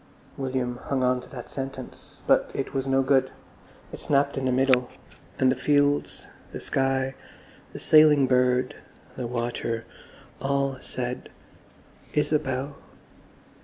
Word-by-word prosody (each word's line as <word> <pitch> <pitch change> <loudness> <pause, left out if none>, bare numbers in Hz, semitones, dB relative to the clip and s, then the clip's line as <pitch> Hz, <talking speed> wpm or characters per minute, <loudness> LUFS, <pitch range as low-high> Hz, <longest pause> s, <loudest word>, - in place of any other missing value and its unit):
William 130 -2 -2
hung 135 -2 +1
on 125 0 +2
to - - -14
that 125 -3 -8
sentence, 135 -1 -8
but - - +3
it 135 - -3
was 135 -1 -1
no 135 0 +3
good; 135 0 +3 0.6
it - - -7
snapped 140 0 +1
in 135 - -2
the 130 - +2
middle, 130 -1 +3 0.5
and 130 -1 +4
the - - +1
fields, 145 +2 +1 0.3
the - - -6
sky, 135 0 0 0.6
the - - -8
sailing 155 -3 +6
bird, 125 0 +2 0.4
the 125 - -4
water, 120 -1 -3 0.6
all 140 0 0
said, 125 -1 -4 0.9
"Isabel." 145 -2 0
135 Hz, 130 wpm, -26 LUFS, 125-140 Hz, 0.9 s, sailing